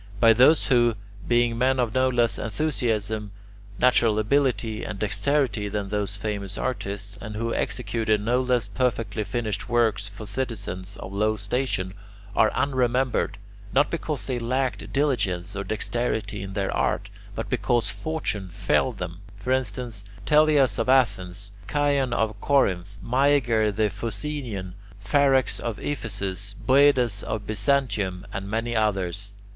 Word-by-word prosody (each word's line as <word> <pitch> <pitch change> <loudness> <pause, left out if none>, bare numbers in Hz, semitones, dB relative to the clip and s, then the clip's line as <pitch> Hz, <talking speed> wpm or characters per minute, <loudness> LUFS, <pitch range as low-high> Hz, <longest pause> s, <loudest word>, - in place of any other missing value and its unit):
But 115 0 +6
those 145 +6 +6
who, 120 -3 +3 0.3
being 120 -1 +2
men 130 +1 +3
of 120 -3 +1
no 130 0 +3
less 120 -2 +1
enthusiasm, 110 -4 -1 0.5
natural 120 -4 +4
ability, 110 -2 +1
and 110 - -4
dexterity 115 0 +1
than 100 -1 -3
those 105 0 -1
famous 100 -2 -4
artists, 100 -3 -4
and 110 -2 -6
who 115 +2 -1
executed 110 -3 0
no 120 +5 +1
less 125 -4 +1
perfectly 115 -2 -1
finished 105 0 -3
works 110 -3 +1
for 105 +1 -9
citizens 105 -4 -4
of 95 - -8
low 105 +2 +1
station, 110 -6 -2 0.4
are 110 - +4
unremembered, 130 -2 +1 0.4
not 145 +2 +3
because 160 -3 -3
they 125 -2 -2
lacked 130 +2 -1
diligence 105 -10 0
or 100 - -2
dexterity 110 0 -2
in 95 0 -6
their 100 -1 -1
art, - - 0 0.2
but - - -3
because 120 -3 +1
fortune 105 -5 -3
failed - - +1
them; 90 0 -5 0.2
for 105 +5 -3
instance, 125 -5 -2 0.2
Teleas 150 -4 +4
of 115 - 0
Athens, 100 -6 +2 0.2
Chion 145 -3 +2
of 110 -3 -1
Corinth, 100 -9 +1
Myager 125 -4 +3
the 105 0 +1
Phocaean, 105 -2 -4 0.3
Pharax 135 +5 +3
of 115 -3 -3
Ephesus, 100 -7 -4
Boedas 130 -6 +4
of 105 -1 -4
Byzantium, 105 -5 0
and 95 +1 -4
many 115 +2 -1
others. 100 -2 -1
110 Hz, 135 wpm, -25 LUFS, 100-130 Hz, 0.5 s, But